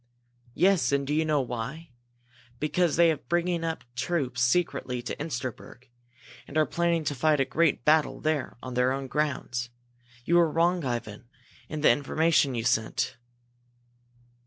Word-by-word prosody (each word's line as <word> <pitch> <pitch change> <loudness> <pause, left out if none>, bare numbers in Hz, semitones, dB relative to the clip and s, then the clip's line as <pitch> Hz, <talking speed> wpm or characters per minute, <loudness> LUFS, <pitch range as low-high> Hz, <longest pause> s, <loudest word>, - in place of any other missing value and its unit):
"Yes, 180 -8 +3
and 140 0 +1
do 145 - -2
you 155 +1 +2
know 155 -2 +1
why? 130 +6 -6 0.7
Because 165 +1 +1
they 170 0 +5
have 155 - 0
been - - -35
bringing 175 0 0 0.3
troops 130 -2 -2
up - - +5
secretly 125 -3 0
to - - -4
Insterberg, 130 -3 -6 0.6
and 150 - -5
are 155 - +4
planning 170 +2 0
to 145 - -1
fight 150 +2 +2
a 135 - +3
great 155 -2 +1
battle 155 0 +3
there 155 -5 -2
on 130 - -6
their 125 +1 +2
own 135 0 -4
grounds! 130 -4 -2 0.6
You 170 - +3
were 170 -2 +4
wrong, 170 +2 +1
Ivan, 120 -2 -5 0.4
in 155 -1 -4
the - - +6
information 145 -1 +2
you 115 - -2
sent." 110 -2 0
150 Hz, 160 wpm, -27 LUFS, 125-165 Hz, 0.7 s, the